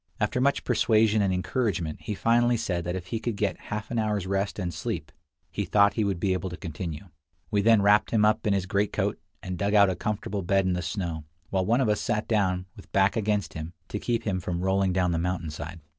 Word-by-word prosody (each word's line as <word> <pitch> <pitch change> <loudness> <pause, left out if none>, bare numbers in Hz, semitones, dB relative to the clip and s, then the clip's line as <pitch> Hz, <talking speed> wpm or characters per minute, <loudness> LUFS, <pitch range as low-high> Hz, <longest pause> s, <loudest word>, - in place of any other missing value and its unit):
After 110 +3 0
much 140 +2 +2
persuasion 110 -2 +3
and 100 -2 +2
encouragement, 90 -4 -1
he 105 - -4
finally 120 +3 +3
said 90 -7 -2
that 90 +1 -2
if 90 -1 -5
he 115 +5 -3
could 115 -1 -2
get 100 -1 -1
half 105 +1 -4
an 120 - 0
hour's 105 -3 0
rest 100 +1 -1
and 90 -4 -3
sleep, - - -4 0.4
he 100 +4 -2
thought 100 +2 +4
he 110 - 0
would 100 -4 -1
be 95 +1 +1
able 95 0 -2
to 90 - -7
continue. 85 0 -6 0.4
We 100 - +2
then 110 -1 +5
wrapped 105 +1 +4
him 105 -2 +3
up 110 0 +2
in 100 - +3
his 95 -2 0
greatcoat, 100 +2 0 0.2
and 90 -1 -5
dug 100 +1 +1
out 100 -2 +6
a - - -2
comfortable 105 -1 -3
bed 95 +2 +2
in 95 - +1
the 90 - -1
snow, 85 -3 -3 0.3
while 95 -1 0
one 120 +4 +3
of 130 - +2
us 105 0 +1
sat 110 -2 -1
down, 95 -5 +1
with 100 - -14
back 100 +2 +3
against 105 -2 0
him, 80 +2 -6 0.2
to 105 - -3
keep 120 0 -1
him 95 -4 -1
from 85 -1 -3
rolling 95 0 +2
down 90 -1 +1
the 85 - 0
mountain 85 -2 -2
side. 80 +3 -7
100 Hz, 235 wpm, -27 LUFS, 90-105 Hz, 0.4 s, out